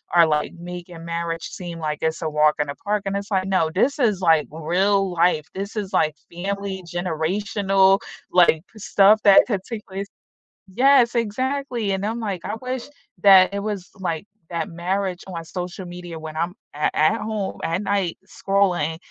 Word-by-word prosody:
are, 170 - +8
like, 150 -1 0
making 175 -1 -9
marriage 170 0 -3
seem 175 -2 -7
like 150 -1 -3
it's 160 0 -1
a 155 - 0
walk 150 0 +3
in 145 - 0
the 140 - -5
park, 205 0 0
and 195 0 -2
it's 200 +1 -4
like, 190 -1 +1
"No, 185 -5 +1
this 275 +10 +1
is, 215 -7 +2
like, 160 -4 +3
real 185 +5 +1
life. 170 -3 +2
This 200 +3 -5
is, 200 -2 -4
like, 155 -4 +2 0.2
family 195 +1 -4
generational, 190 +3 +2 0.3
like, 170 -2 +4
stuff 205 +1 +4
that 200 -1 +8
particularly" 200 -2 -4 0.6
Yes, 250 +3 +4
exactly, 245 +1 -1
and 195 +1 -1
I'm 225 +2 -2
like, 195 -6 -4
"I - - -3
wish 255 -1 -4 0.4
that 190 -1 +8
it 200 - -1
was, 205 -4 -4
like, 170 -2 -3 0.3
that 165 -1 -2
marriage 180 +2 -2
on 170 -3 -6
social 180 +2 -6
media 175 -1 -8
when 155 0 -8
I'm 170 +2 -1 0.2
at 150 - +1
at 185 +9 +3
home 215 -3 -3
at 170 +4 -1
night 195 -4 0
scrolling, 180 -6 0
190 Hz, 170 wpm, -22 LUFS, 170-200 Hz, 0.6 s, are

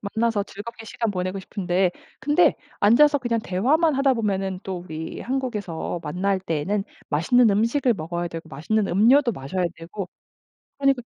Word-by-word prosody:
만나서 225 -2 +1
즐겁게 225 +3 -9
시간 225 0 -2
보내고 185 0 -3
싶은데 185 -2 0 0.3
근데 295 +6 +3 0.2
앉아서 285 +8 +5
그냥 240 -4 -1
대화만 285 - +2
하다 275 0 +3
보면은 195 -5 -1
또 190 -1 -4
우리 160 -2 -7
한국에서 215 -11 -3
만날 185 +5 0
때에는 185 +4 -1 0.3
맛있는 220 - +4
음식을 230 +5 +2
먹어야 175 -1 -3
되고 165 -1 -8
맛있는 195 +9 0
음료도 240 +8 +4
마셔야 180 +2 -3
되고 180 +4 -6 0.7
그러니까 275 -2 +2
205 Hz, 360 characters per minute, -24 LUFS, 180-245 Hz, 0.7 s, 앉아서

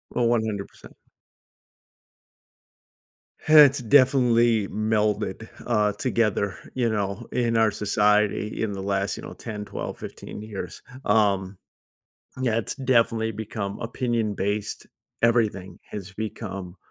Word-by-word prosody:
Oh, 120 - +2
100%. 110 -4 -2 2.5
It's 150 -2 +8
definitely 120 -4 +4
melded, 110 -1 -1 0.2
uh, 105 -3 +2
together, 105 -6 0 0.2
you 120 -3 +1
know, 105 +1 -2
in 120 -2 0
our 110 -1 +4
society 105 0 +1
in 110 -2 -1
the 95 - -5
last, 100 0 -1
you - - -9
know, - - -8
10, 105 -3 -6
12, - - -6
15 - - -8
years. 105 -2 -7 0.2
Um, 100 -3 +2 0.8
yeah, 115 -3 +1
It's 115 - -3
definitely 115 -4 +2
become 105 -2 -5
opinion 115 -3 -1
based. 100 +2 -3 0.4
Everything 110 -5 +1
has 100 -2 -7
become 100 -3 -6
110 Hz, 110 wpm, -25 LUFS, 100-115 Hz, 2.5 s, It's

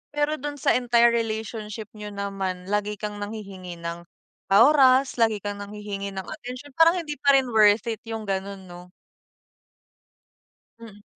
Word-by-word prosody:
pero 295 0 0
dun 290 +1 -5
sa 285 - +1
entire 235 -1 +4
relationship 220 -2 -4
niyo 210 -1 -9
naman 195 -2 -3
lagi 210 0 0
kang 210 0 -6
nanghihingi 200 -4 -7
ng 170 +1 -6 0.4
oras, 260 +4 +5
lagi 220 -3 +2
kang 205 0 -4
nanghihingi 205 -1 -6
ng 190 - -4
atensyon, 255 - -8
parang 335 +1 +5
hindi 300 -3 -6
pa 280 -1 +5
rin 260 -2 +2
worth 215 -1 +5
it 220 - -5
yung 225 -1 -4
gano'n, 195 -1 -4
'no? 175 0 -12 1.9
Mm. 210 -3 -12
215 Hz, 145 wpm, -25 LUFS, 200-250 Hz, 1.9 s, oras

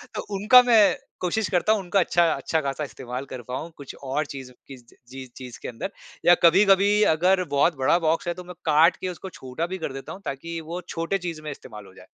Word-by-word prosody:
तो - - -2
उनका 215 +6 +7
मैं 220 -4 +5 0.3
कोशिश 185 +3 -1
करता 185 +2 +1
हूँ 210 - -1
उनका 185 +2 0
अच्छा 175 -1 +2
अच्छा 160 - -1
ख़ासा 140 +1 -3
इस्तेमाल 130 -2 -7
कर 130 -2 -8
पाऊँ 140 +6 -4
कुछ 140 -2 -10
और 140 +3 -2
चीज़ 135 -3 -9 0.2
की 135 - -10
चीज़ 125 +1 -13
चीज़ 125 -2 -10
के - - -6
अंदर 125 +11 -6 0.3
या 175 - +7
कभी-कभी 195 +3 +5 0.3
अगर 185 +2 +3
बहुत 150 +4 +3
बड़ा 135 +5 +3
बॉक्स 165 +2 0
है 175 - 0
तो 180 +1 -10
मैं 180 0 -10
काट 160 +3 +5
के 185 - -2
उसको 180 +2 -8
छोटा 130 +6 -4
भी - - -3
कर 135 - -5
देता 135 0 -8
हूँ 195 - -11
ताकि 165 +5 -5
वो 180 +1 -4
छोटे 165 +4 -2
चीज़ 165 -2 -5
में 150 -1 -6
इस्तेमाल 105 -6 -11
हो 95 - -16
जाए। - - -16
165 Hz, 225 wpm, -24 LUFS, 135-185 Hz, 0.3 s, उनका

